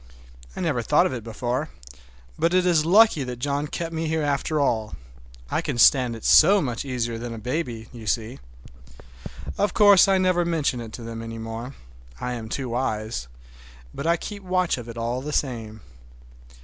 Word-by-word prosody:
I - - -5
never - - 0
thought - - +3
of - - -1
it 120 -4 -5
before, 120 +2 -3 0.7
but 170 +2 +1
it 185 0 +3
is 165 -3 +3
lucky 205 -5 +5
that 125 -1 -5
John 140 +3 -2
kept 165 +2 -5
me 160 0 -2
here 160 0 0
after 145 +2 0
all. 110 -6 0 0.6
I - - +1
can - - -3
stand 125 0 +5
it 115 - -10
so 195 +6 +7
much 125 -9 -3
easier 120 -4 -3
than 120 0 -5
a - - -8
baby, 120 -1 -4
you 115 -3 -10
see. 115 +3 -2 1.2
Of 205 -3 +1
course 205 -4 +7
I 195 -1 +4
never 185 -1 +2
mention 155 -7 -1
it 115 -2 -8
to 120 - -8
them 115 0 -6
any 115 0 -7
more,—I 115 - -8
am 115 -2 -6
too 130 +2 -3
wise,—but 60 - -6
I 170 +1 +3
keep 205 +4 -7
watch 185 -6 0
of 120 -1 -9
it 115 - -8
all 120 +2 -2
the 150 +2 -5
same. 115 -7 -3
125 Hz, 180 wpm, -24 LUFS, 115-160 Hz, 1.2 s, so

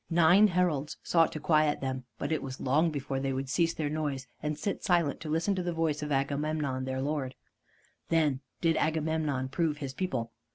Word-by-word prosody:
Nine 175 +5 +6
heralds 170 -6 0
sought 165 -1 +3
to 155 - -4
quiet 155 -1 +3
them, 130 -1 -3
but - - -3
it 155 - +1
was 130 -1 -6
long 150 +6 +2
before 140 -3 -3
they 135 0 -1
would 135 +1 -2
cease 165 +4 +1
their 155 - -1
noise, 145 -3 -2 0.2
and 150 0 -2
sit 200 +5 -3
silent 170 -5 +2
to 155 - -6
listen 165 +6 +1
to 185 - -1
the 175 -1 -2
voice 160 -2 0
of 150 0 -4
Agamemnon 140 -1 -1
their 130 0 -2
lord. 140 -3 -2 0.7
Then 155 -5 +2 0.2
did 165 -1 +3
Agamemnon 155 -4 0
prove 155 +1 0
his 140 -3 -5
people. 130 -10 -2
150 Hz, 195 wpm, -30 LUFS, 135-165 Hz, 0.7 s, Nine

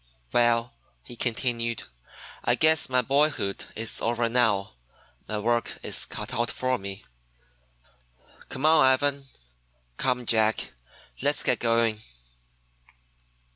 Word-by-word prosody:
"Well," 120 0 +2 0.3
he 120 - -11
continued, 115 - -1 0.6
"I - - +3
guess 160 -3 +3
my 125 -1 +2
boyhood 140 -6 0
is 115 +1 0
over 120 0 0
now. 110 - +1 0.5
My 110 - -3
work 120 +2 -1
is - - +1
cut - - -7
out 120 0 0
for 130 0 -1
me. 95 0 -7 1.4
Come 135 +3 -4
on, 155 -1 +5
Ivan, 140 +1 +2 0.7
come 125 -2 -1
Jack, 110 -1 +2 0.5
let's - - +2
get - - +2
going!" 115 -2 +1
120 Hz, 110 wpm, -26 LUFS, 115-130 Hz, 1.4 s, on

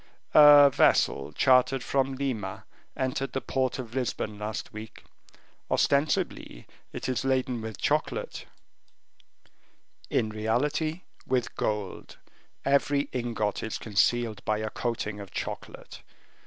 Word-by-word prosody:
"A 145 -2 +9
vessel - - +3
chartered 130 - +3
from 135 -1 0
Lima 115 -9 -4 0.3
entered 130 +1 -2
the 135 - 0
port 130 -1 -1
of 120 -3 -7
Lisbon 115 -4 -3
last 105 0 -5
week; 110 0 -10 0.7
ostensibly 140 - 0 0.3
it - - -5
is 130 - -1
laden 130 -3 0
with 110 -3 -6
chocolate, - - -2 1.6
in 110 - +1
reality 145 +10 -1 0.3
with 125 -2 0
gold. 105 -2 -3 0.5
Every 140 +1 +2
ingot 115 -4 -2
is 110 - -3
concealed 110 +1 0
by 110 - 0
a 110 0 -4
coating 110 -3 -3
of 100 -1 -8
chocolate. - - -7
125 Hz, 115 wpm, -27 LUFS, 110-135 Hz, 1.6 s, A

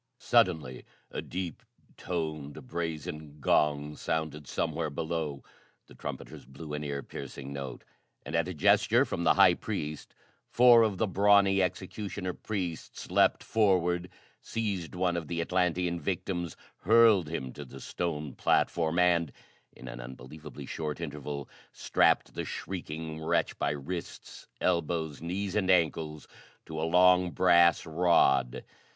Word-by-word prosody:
Suddenly 85 - +1 0.3
a - - -4
deep 90 -2 -5 0.3
toned 75 -4 -4
brazen 80 -2 -5
gong 75 +1 +1
sounded 75 -3 -3
somewhere 80 +2 -2
below; 80 -1 -3 0.4
the - - -17
trumpeters - - -7
blew 75 +4 -9
an 75 0 -3
ear 70 -1 -4
piercing 70 0 -8
note; 70 -3 -6 0.4
and, - - -4
at 85 +1 +1
a 90 - -4
gesture 75 - +4
from - - -3
the - - +4
high - - +7
priest, 75 0 -5 0.3
four 120 -1 +7
of 110 -4 +1
the 110 - +2
brawny 100 0 +4
executioner 95 +1 -3
priests 90 -7 -5
leaped - - +3
forward, 90 -4 +1 0.3
seized 100 -7 -3
one 90 -1 +1
of 85 -3 -3
the 85 +1 -3
Atlantean 90 0 0
victims, 85 +1 -3 0.2
hurled 110 -7 +5
him 65 -6 -4
to 75 - -8
the 65 0 -11
stone 75 0 -4
platform 80 0 +1
and, 85 -4 +3 0.4
in - - -12
an - - -7
unbelievably 65 +4 -10
short 75 -1 -4
interval, 75 -3 -5 0.3
strapped - - +2
the - - -3
shrieking 80 -3 -6
wretch 80 - +1
by - - +1
wrists, 75 +5 -6
elbows, 80 -4 0
knees 95 +3 -3
and 95 -3 +1
ankles 80 -3 +1 0.4
to 80 -1 -5
a 80 - 0
long, 90 +1 +5
brass 85 -1 +4
rod. 80 -7 +2
85 Hz, 135 wpm, -29 LUFS, 75-90 Hz, 0.4 s, high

